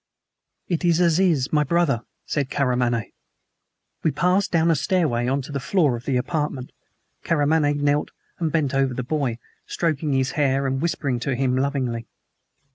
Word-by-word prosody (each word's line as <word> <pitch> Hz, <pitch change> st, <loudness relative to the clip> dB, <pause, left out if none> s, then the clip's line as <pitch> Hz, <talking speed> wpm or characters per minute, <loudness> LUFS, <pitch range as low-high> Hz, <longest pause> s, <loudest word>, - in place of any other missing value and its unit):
"It 170 Hz, -2 st, -1 dB
is 170 Hz, -1 st, +3 dB
Aziz, 170 Hz, -5 st, +2 dB
my 150 Hz, -1 st, +4 dB
brother," 150 Hz, -5 st, +1 dB, 0.2 s
said 140 Hz, -3 st, -1 dB
Karamaneh. 125 Hz, -4 st, 0 dB, 0.9 s
We 160 Hz, -, +2 dB
passed 180 Hz, +6 st, +1 dB
down 165 Hz, -1 st, +3 dB
a -, -, +3 dB
stairway 135 Hz, -6 st, +1 dB
on 135 Hz, +1 st, 0 dB
to 145 Hz, -, -9 dB
the 140 Hz, -, -2 dB
floor 145 Hz, -2 st, +2 dB
of 120 Hz, +2 st, -8 dB
the 135 Hz, -2 st, +1 dB
apartment. 145 Hz, -2 st, -2 dB, 0.5 s
Karamaneh 150 Hz, -1 st, +2 dB
knelt 145 Hz, 0 st, +1 dB, 0.3 s
and 165 Hz, -3 st, 0 dB
bent 145 Hz, -4 st, 0 dB
over 135 Hz, -2 st, +1 dB
the 125 Hz, -, -3 dB
boy, 135 Hz, -4 st, -1 dB, 0.3 s
stroking 155 Hz, -3 st, -1 dB
his 130 Hz, 0 st, +1 dB
hair 140 Hz, -2 st, +1 dB
and 135 Hz, 0 st, -1 dB
whispering 140 Hz, -7 st, -1 dB
to 130 Hz, +2 st, -1 dB
him 130 Hz, 0 st, +1 dB
lovingly. 130 Hz, -4 st, -1 dB
140 Hz, 160 wpm, -23 LUFS, 130-160 Hz, 0.9 s, my